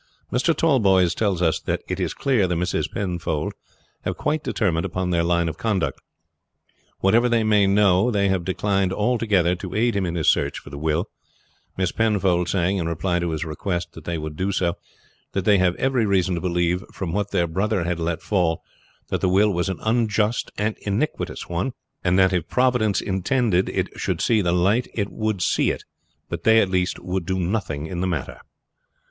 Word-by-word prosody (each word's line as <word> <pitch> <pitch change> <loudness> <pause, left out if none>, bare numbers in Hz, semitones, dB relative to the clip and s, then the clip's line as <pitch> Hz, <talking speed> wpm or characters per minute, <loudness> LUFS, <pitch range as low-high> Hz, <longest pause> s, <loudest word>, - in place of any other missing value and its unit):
Mr. 145 +7 +2
Tallboys 100 - +3
tells 100 -5 0
us 80 -2 +2
that - - -3
it - - -3
is - - -2
clear 125 -9 +2
the 90 - -1
Misses 90 +2 -1
Penfold 85 -5 -3 0.5
have - - -3
quite 150 +1 -1
determined 85 -6 0
upon 90 -1 -2
their 85 -1 +2
line 85 0 +1
of 80 -1 -5
conduct. 100 -7 -1 1.0
Whatever 115 +5 +4
they 115 -1 +2
may 105 -2 +4
know 100 +1 +4
they 100 -4 +1
have 95 -2 0
declined 95 +1 0
altogether 105 -5 +2
to 90 0 -7
aid 115 +1 +2
him 95 -2 0
in 85 - -3
his 80 -3 -1
search - - +2
for - - -11
the 70 - -7
will, 80 +6 -1 0.7
Miss 95 -2 0
Penfold 95 -6 +1
saying, 95 +1 +1
in 85 -3 -1
reply 85 +2 -1
to 85 0 -1
his 80 0 -3
request 85 +3 -3
that - - -12
they 85 -1 -2
would 75 -1 -5
do 95 +5 -1
so, 90 -3 0 0.6
that 95 -2 -1
they 105 -2 +5
had 90 -1 +2
every 130 -5 +1
reason 95 -2 +2
to 85 - -2
believe 90 0 0
from 85 -4 -4
what 100 0 -1
their 85 - +1
brother 95 +3 0
had 85 0 -2
let 85 0 -2
fall 90 -6 0 0.5
that - - -1
the 95 - +2
will 100 +3 +4
was 90 +2 -1
an 95 - -3
unjust 110 -1 +1
and 105 +1 0
iniquitous 105 +9 -2
one; 85 +9 -2 0.3
that 95 +1 +3
if 90 -3 -1
Providence 125 -6 +2
intended 95 0 +1
it - - -1
should - - -1
see 110 -3 +2
the 90 -2 +1
light 95 +8 +2
it 100 -2 -2
would 110 -4 -1
see - - +2
it; - - -3 0.4
but - - -5
they 110 0 +6
at 95 -4 +1
least 90 -1 0
would 90 0 -3
do 95 - 0
nothing 90 -5 -2
in 85 +1 -4
the 95 - 0
matter. 80 -7 -4
95 Hz, 195 wpm, -23 LUFS, 85-105 Hz, 1.0 s, they